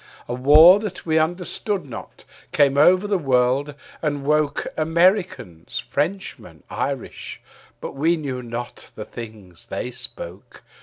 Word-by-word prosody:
A 120 - -3
war 150 +9 +7
that 205 -4 -6
we 160 -1 +2
understood 180 +4 -2
not 125 - -10 0.3
came 140 -2 +3
over 180 +7 +5
the 205 -2 0
world 135 +1 +1 0.3
and 145 -3 -2
woke 150 0 +1
Americans, 160 - 0
Frenchmen, 180 +7 -4
Irish; - - -5 0.4
but - - -6
we 160 +5 +1
knew 135 -5 -4
not 120 0 -7
the - - -7
things 105 -7 -11
they 125 - -4
spoke. - - -5
150 Hz, 125 wpm, -22 LUFS, 125-175 Hz, 0.4 s, war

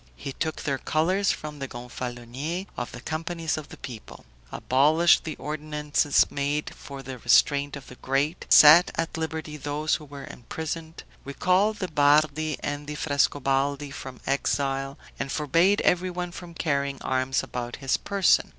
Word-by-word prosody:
He 135 - -6
took 160 +2 -3
their 135 -3 -1
colors 185 +6 +1
from 150 -1 -6
the 135 - -4
Gonfaloniers 125 +7 -5
of 120 - -4
the - - -9
companies 165 +2 -3
of 155 -1 -7
the - - -11
people; 120 -5 -10 0.3
abolished 155 +6 +3
the 160 - -4
ordinances 150 -1 +1
made 145 +1 -2
for 140 -1 -10
the 130 -1 -7
restraint 140 +4 +3
of 140 -2 -9
the - - -12
great; 140 +6 -1
set 160 +5 +9
at 165 0 -2
liberty 160 -1 -4
those 150 +2 -2
who 155 - -12
were 140 -1 -9
imprisoned; 160 +5 -6 0.2
recalled 185 +9 +1
the 185 - -3
Bardi 150 0 +2
and 145 0 -4
the 150 - -5
Frescobaldi 140 0 0
from 130 -2 -8
exile, 135 0 -1 0.2
and 135 0 -3
forbade 165 +8 +2
everyone 180 0 0
from 175 -1 -10
carrying 140 -3 -1
arms 130 0 0
about 120 -1 -5
his 135 -1 0
person. 200 -3 +2
145 Hz, 150 wpm, -26 LUFS, 135-160 Hz, 0.3 s, set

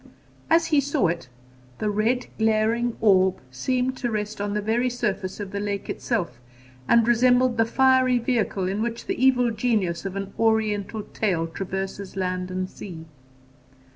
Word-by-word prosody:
As 330 +1 +4
he 290 - +6
saw 280 - +1
it, 170 -6 -4 0.5
the 210 - -1
red 225 +5 +1
glaring 225 +2 +1
orb 190 -3 +4
seemed 255 - -1
to 245 - -2
rest 210 -1 -3
on 205 0 -2
the - - +1
very 230 +4 +1
surface 210 -6 -3
of 200 -2 -5
the 200 - -3
lake 200 -1 -3
itself, 175 - -2 0.5
and 235 -1 +4
resembled 245 +1 +4
the 225 - +5
fiery 260 0 +4
vehicle 225 -6 0
in 195 +3 -2
which 230 0 -3
the - - -2
Evil 250 -2 +4
Genius 210 -7 0
of 195 -1 -5
an 195 0 -5
Oriental 220 -1 +1
tale 180 -6 0
traverses 190 +3 -5
land 185 -1 -2
and 185 0 -2
sea. 170 -4 -9
215 Hz, 160 wpm, -24 LUFS, 190-240 Hz, 0.5 s, he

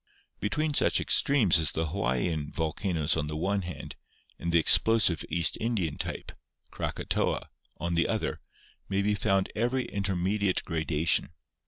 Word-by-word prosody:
Between 150 +8 -1
such - - +3
extremes 115 - +4
as 80 - +1
the 80 -1 -1
Hawaiian 75 +5 -1
volcanoes 80 0 -1
on 75 - -2
the 75 - -5
one 100 +5 0
hand 90 -1 -7 0.4
and 85 - -2
the 85 - +4
explosive 100 +1 +4
East 85 +1 0
Indian 105 -10 -1
type - - -4 0.4
(Kraka - - -4
toa) - - -1 0.3
on 85 0 -3
the 85 0 +2
other - - -2 0.5
may 100 0 0
be 105 +1 +1
found 95 -1 0
every 120 +3 0
intermediate 100 0 -1
grada 80 -1 -2
tion. - - +3
90 Hz, 150 wpm, -28 LUFS, 80-105 Hz, 0.5 s, extremes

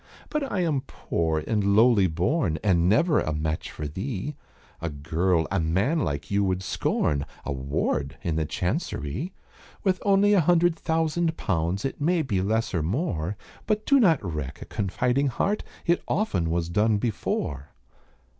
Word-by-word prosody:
"But 300 -3 -2
I 185 - 0
am 155 -6 +1
poor 80 -2 -1
and 100 -3 +1
lowly 110 -3 +5
born, 90 - 0
And 90 -4 +3
never 150 - +4
a 75 - -1
match 75 +1 -2
for 75 - -5
thee 105 - -4 0.5
A 85 - -2
girl 80 +4 0
a 95 - +1
man 95 - +1
like 70 - -2
you 100 0 +2
would 95 -1 0
scorn, 70 -5 0 0.2
A - - -2
ward 70 +1 -1
in 80 - -1
the 80 -1 0
Chancerie, 115 - -2 0.5
With 185 -2 +1
only 200 +1 +4
a 195 - +5
hundred 175 +1 +3
thousand 165 0 0
pounds, 90 +2 -1
It 135 - -4
may 165 +2 +2
be 100 -9 0
less 110 +4 0
or 85 - +1
more; 90 - -1 0.3
But 215 0 0
do 280 -1 +5
not 165 - +4
wreck 75 -6 -4
a - - -8
confiding 125 +8 0
heart, 200 +10 0 0.2
It 170 0 +2
often 95 - 0
was 85 0 0
done 105 +5 +2
before." 75 - -2
100 Hz, 165 wpm, -26 LUFS, -, 0.5 s, lowly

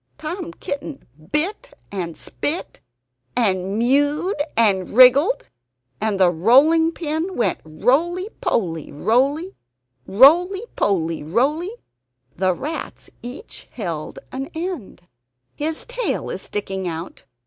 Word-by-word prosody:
Tom 335 +3 -5
Kitten 280 -1 -6 0.3
bit 390 +11 -1
and 175 -5 -4
spit, 320 +5 -4 0.6
and 195 -4 +1
mewed 290 - +2 0.2
and 200 -4 +2
wriggled; 275 - +6 0.5
and 210 -3 0
the 180 -2 +5
rolling 280 - +5
pin 330 +3 -3
went 240 - 0
roly 305 - +1
poly, 165 -7 -1
roly; 275 - +1 0.5
roly 345 - +5
poly, 165 -5 0
roly. 270 - 0 0.7
The 185 0 +1
rats 305 - -6
each 255 - -9
held 170 -9 -5
an 270 +2 -5
end. 320 - -5 0.5
"His 310 +2 -3
tail - - -2
is - - -5
sticking 195 -2 -4
out! 165 +1 -6
265 Hz, 105 wpm, -21 LUFS, -, 0.7 s, wriggled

